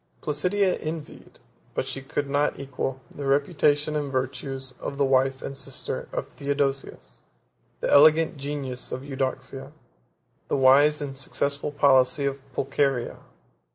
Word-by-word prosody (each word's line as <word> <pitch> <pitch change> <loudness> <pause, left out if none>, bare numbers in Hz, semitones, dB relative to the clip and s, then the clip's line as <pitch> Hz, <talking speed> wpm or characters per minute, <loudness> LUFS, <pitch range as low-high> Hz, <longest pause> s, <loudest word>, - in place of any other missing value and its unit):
Placidia 180 +6 +1
envied, 155 -1 -7 0.4
but - - 0
she 135 +1 -4
could 140 +1 -3
not 145 0 0
equal, 135 -1 -4
the 145 - -7
reputation 145 +1 +2
and 145 -2 -2
virtues 130 0 -3
of 140 - -5
the 140 - +3
wife 135 0 +2
and 135 - -5
sister - - -3
of - - -3
Theodosius, 140 -1 -3 0.6
the - - 0
elegant 155 +3 +6
genius 140 -3 -4
of 130 - -4
Eudocia, 135 -2 -4 0.8
the - - 0
wise 145 +3 +5
and 135 -2 -5
successful 140 +2 -2
policy 140 -1 +4
of 140 0 -1
Pulcheria. 135 -2 0
140 Hz, 130 wpm, -25 LUFS, 135-145 Hz, 0.8 s, elegant